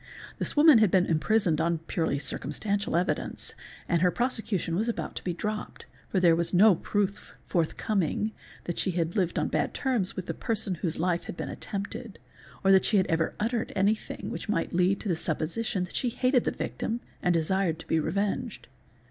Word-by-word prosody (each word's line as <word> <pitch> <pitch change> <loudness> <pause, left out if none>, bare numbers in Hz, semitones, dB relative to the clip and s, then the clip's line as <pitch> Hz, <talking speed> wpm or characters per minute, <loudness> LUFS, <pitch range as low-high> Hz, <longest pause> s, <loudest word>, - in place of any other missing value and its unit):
This - - -3
woman 295 -5 +8
had 215 -3 +5
been 185 0 +4
imprisoned 170 0 +2
on 170 0 +1
purely 160 -2 -1
circumstantial 165 +9 -2
evidence 180 +2 -1 0.3
and 170 -2 +2
her 180 - +5
prosecution 225 -6 -1
was 220 +6 0
about 235 - -3
to - - -5
be 180 - -1
dropped, 210 +5 -4 0.2
for 190 - +1
there 170 -2 +5
was 170 +1 0
no 205 +3 +7
proof 205 +3 -2
forthcoming 190 +3 0 0.3
that 175 - -3
she - - +1
had 165 0 0
lived 185 -4 0
on - - +1
bad - - -1
terms 245 -9 +1
with 185 - -4
the - - -3
person 220 -4 -1
whose 170 -2 -1
life 175 0 0
had - - -7
been - - -4
attempted 205 +1 -5 0.5
or 195 - +5
that 190 -1 +6
she 210 - +3
had 190 - +4
ever 165 -1 0
uttered 230 +2 -1
anything 205 +3 0
which - - -6
might 165 -6 0
lead 180 +2 +3
to - - -5
the 175 - +2
supposition 175 +5 -2
that 180 - -8
she 250 - 0
hated 250 +1 +2
the - - +1
victim 235 +2 -3 0.2
and 180 -2 +2
desired 165 +1 +1
to 165 - -11
be 160 - +1
revenged. 200 +6 -2
190 Hz, 190 wpm, -28 LUFS, 170-215 Hz, 0.5 s, woman